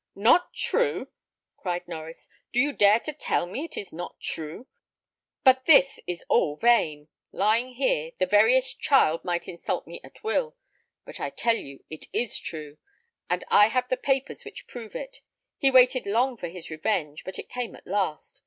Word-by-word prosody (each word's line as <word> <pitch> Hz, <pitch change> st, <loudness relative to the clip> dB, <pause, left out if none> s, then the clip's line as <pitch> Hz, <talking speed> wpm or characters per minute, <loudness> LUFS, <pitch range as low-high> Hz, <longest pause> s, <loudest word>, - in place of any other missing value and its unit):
"Not 230 Hz, -, +3 dB
true!" -, -, 0 dB, 0.5 s
cried 180 Hz, -2 st, -3 dB
Norries; 165 Hz, -1 st, -9 dB, 0.2 s
"do 245 Hz, -, +1 dB
you 285 Hz, +3 st, +2 dB
dare 205 Hz, 0 st, +5 dB
tell 300 Hz, -, -2 dB
me 255 Hz, -, -5 dB
it -, -, -10 dB
is 200 Hz, -, -6 dB
not 175 Hz, +2 st, -7 dB
true? 160 Hz, +9 st, -5 dB, 0.8 s
But 260 Hz, -1 st, +5 dB
this 275 Hz, -3 st, +5 dB
is 175 Hz, -1 st, -5 dB
all 145 Hz, -, +2 dB
vain 155 Hz, -9 st, +2 dB, 0.2 s
lying 230 Hz, +5 st, +1 dB
here, 165 Hz, -, 0 dB
the 185 Hz, -, +2 dB
veriest 225 Hz, +7 st, +3 dB
child 165 Hz, -, +3 dB
might 175 Hz, -1 st, -2 dB
insult 170 Hz, -, -4 dB
me -, -, -10 dB
at -, -, -16 dB
will. 470 Hz, +2 st, -1 dB, 0.5 s
But -, -, -10 dB
I -, -, -2 dB
tell 230 Hz, -1 st, +1 dB
you 140 Hz, -9 st, -9 dB
it 155 Hz, -, -8 dB
is 240 Hz, -3 st, -1 dB
true, 155 Hz, -2 st, -8 dB, 0.5 s
and -, -, 0 dB
I 205 Hz, 0 st, +7 dB
have 250 Hz, +2 st, -1 dB
the 255 Hz, -, +2 dB
papers 270 Hz, +1 st, -1 dB
which -, -, -10 dB
prove 230 Hz, -3 st, -10 dB
it. -, -, -7 dB, 0.4 s
He 275 Hz, -, +4 dB
waited 255 Hz, -2 st, +5 dB
long 245 Hz, +5 st, +1 dB
for 180 Hz, -, -6 dB
his 170 Hz, -1 st, -9 dB
revenge, 155 Hz, -3 st, -2 dB
but 190 Hz, -, -7 dB
it -, -, -7 dB
came 245 Hz, -1 st, -5 dB
at -, -, -17 dB
last. 185 Hz, -6 st, -2 dB
215 Hz, 175 wpm, -26 LUFS, 170-255 Hz, 0.8 s, I